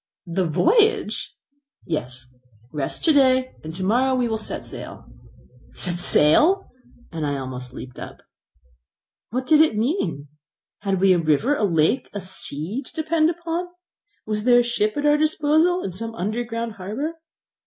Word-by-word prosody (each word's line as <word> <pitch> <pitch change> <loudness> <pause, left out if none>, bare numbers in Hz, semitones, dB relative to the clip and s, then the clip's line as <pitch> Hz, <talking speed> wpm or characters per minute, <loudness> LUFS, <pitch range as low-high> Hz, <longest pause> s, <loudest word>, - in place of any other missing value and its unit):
"The 180 +1 -1
voyage!" 430 - +2 0.5
"Yes, 130 -6 -4 0.5
rest 145 -3 -3
to 320 - +5
day, 260 -2 +3
and 160 - -6
to 190 - -4
morrow 250 +7 +2
we 250 -1 +1
will 220 -1 -2
set 215 - -5
sail." - - -9 0.6
"Set 175 -1 -2
sail!" 300 - +4 0.4
and 165 -2 -4
I 145 -1 -1
almost 130 -1 -7
leaped 125 -1 -10
up. - - -10 1.1
What 255 +3 -3
did 310 +2 +5
it 315 -6 +4
all 210 - -2
mean? 210 - -1 0.5
Had 195 -2 -1
we 190 -1 +6
a 175 - +2
river, 165 - +2
a 215 - +1
lake, 170 - +1
a 205 - -3
sea 185 - -3
to 265 - -16
depend 315 0 +2
upon? 340 +1 -3 0.6
Was 210 -1 -2
there 245 0 +6
a - - -1
ship 215 -2 -1
at 290 - -1
our 295 0 +5
disposal 310 +3 +2
in 190 - -3
some 225 +5 -6
underground 230 +3 -3
harbour? 280 - -4
225 Hz, 160 wpm, -23 LUFS, -, 1.1 s, we